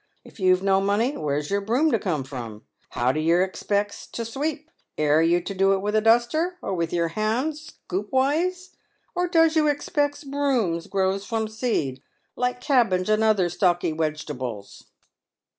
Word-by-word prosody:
If - - -16
you've 185 0 +3
no 195 -1 +3
money, 215 +8 +1
where' 145 -2 -1
s 150 +3 -4
your 200 0 +1
broom 250 +10 +1
to 225 - +2
come 165 -8 -2
from? 120 -5 -8 0.3
How 125 +2 +1
do 155 - -2
yer 170 +4 +3
expex 205 +2 -3
to 230 - -3
sweep? 295 +6 -4 0.3
Aire 150 +1 +3
you 170 +2 +3
to 200 - -5
do 195 +1 +3
it - - +2
with 210 +1 -1
a 215 - +4
duster, 240 +11 +2
or 195 - -4
with, 170 -2 -2
your 170 -1 0
hand, 220 - -1
scoopways? 300 - -2 0.4
or 360 0 0
does 325 -2 +3
you 310 -1 +3
expex 290 0 -1
brooms 260 -12 0
grows 195 0 0
from 225 -2 -1
seed, 215 - -2 0.3
like 250 0 -1
cabbage 230 -10 +2
and 215 +1 +3
other 210 -5 +3
stalky 175 -2 +1
wegetables 150 -9 -4
205 Hz, 170 wpm, -24 LUFS, 170-265 Hz, 0.4 s, a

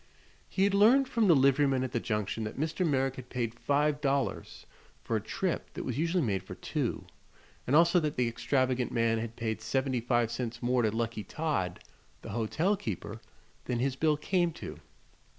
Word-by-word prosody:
He 190 - +1
had 200 0 +3
learned 240 +7 +5
from 230 -5 +2
the 170 - +7
liveryman 135 -1 +3
at 130 - -3
the 120 - 0
Junction 105 0 -2
that 105 - -6
Mr. 160 +4 -1
Merrick 135 -4 +1
had 125 -1 -9
paid 120 -2 -3
five 145 +1 +1
dollars 135 -6 -1 0.4
for - - -1
a - - 0
trip - - -3
that - - -4
was - - -3
usually 170 +1 +1
made 100 -6 0
for - - -9
two, - - -3 0.6
and 135 - +3
also 170 +2 +6
that 150 -3 -2
the 125 -1 +1
extravagant 130 +1 0
man 115 -1 +1
had 115 0 -5
paid 110 -2 -3
seventy 130 +1 0
five 120 -1 +1
cents 120 -1 -4
more 125 0 +2
to 110 - +2
Lucky 115 0 -2
Todd, 100 - -2 0.4
the - - -7
hotel 120 - 0
keeper, 110 - -5 0.4
than 125 - -1
his 130 +2 0
bill 155 +1 +2
came 175 +2 +1
to. - - -8
130 Hz, 185 wpm, -30 LUFS, 115-155 Hz, 0.6 s, the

